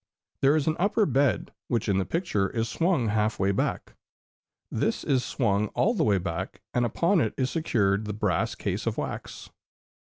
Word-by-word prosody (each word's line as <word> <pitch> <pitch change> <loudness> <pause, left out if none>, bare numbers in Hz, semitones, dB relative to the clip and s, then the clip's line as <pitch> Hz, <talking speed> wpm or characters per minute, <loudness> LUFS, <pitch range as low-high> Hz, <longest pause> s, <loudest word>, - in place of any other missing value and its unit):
There 140 +2 +5
is 150 -3 +1
an 155 - +1
upper 205 +3 +3
bed, 135 - +1
which 115 -2 -1
in 100 -2 +2
the 95 - 0
picture 135 - 0
is 115 -1 -1
swung 165 - +1
half 105 0 +1
way 95 +1 +2
back. 100 - -2 0.8
This - - -1
is 130 -3 +1
swung 105 -5 0
all 230 - +3
the 225 - +1
way 105 -3 +3
back, 90 +1 -4
and 120 0 +2
upon 170 - +2
it 110 - -1
is 130 0 0
secured 105 - +1
the 105 - -3
brass 100 -5 0
case - - -3
of - - -1
wax. - - -6
115 Hz, 185 wpm, -27 LUFS, 100-155 Hz, 0.8 s, There